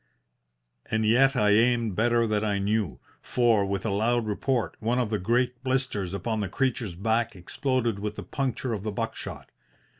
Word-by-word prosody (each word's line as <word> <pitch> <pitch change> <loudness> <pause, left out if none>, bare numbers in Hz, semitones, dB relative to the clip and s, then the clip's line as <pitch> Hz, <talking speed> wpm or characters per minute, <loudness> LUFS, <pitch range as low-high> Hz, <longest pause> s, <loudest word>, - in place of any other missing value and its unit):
And 110 0 +1
yet 135 +5 +4
I 105 -4 +3
aimed 115 -1 +3
better 120 +2 +3
than 105 -1 0
I 105 -2 0
knew, 100 -4 -1 0.2
for, 115 -4 +2
with 100 0 -2
a 110 - 0
loud 115 +3 +1
report, 110 - -1
one 115 +3 0
of 120 -4 0
the 105 - 0
great 120 +5 0
blisters 130 -8 -1
upon 110 +3 -2
the 100 -3 -2
creature's 115 -5 -1
back 110 +4 0
exploded 120 +4 -1
with 105 +1 -4
the - - -6
puncture 130 -2 -2
of 105 - -3
the 105 +1 -3
buck 100 - -3
shot. - - -8
110 Hz, 180 wpm, -27 LUFS, 105-120 Hz, 0.2 s, yet